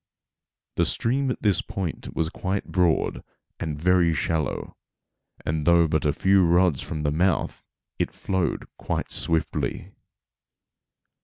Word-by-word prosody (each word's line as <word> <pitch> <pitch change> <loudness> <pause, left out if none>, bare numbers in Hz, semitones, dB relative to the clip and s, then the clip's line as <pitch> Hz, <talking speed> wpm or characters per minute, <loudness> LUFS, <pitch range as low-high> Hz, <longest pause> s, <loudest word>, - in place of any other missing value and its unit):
The - - +3
stream 135 +3 0
at 125 - -4
this 100 -5 +3
point 95 -5 -5
was 80 -1 0
quite 95 +1 -3
broad 90 -3 +1 0.4
and 75 -3 -3
very 85 -1 +3
shallow, 80 +1 -2 0.7
and 75 -1 -1
though 85 -1 +6
but 80 -1 0
a 75 - +4
few 95 +4 +3
rods 85 -4 +3
from 75 -2 -5
the 75 - +1
mouth 85 +2 0 0.4
it - - +1
flowed 95 -4 -2
quite - - -3
swiftly. 80 -2 -1
85 Hz, 130 wpm, -25 LUFS, 80-95 Hz, 0.7 s, though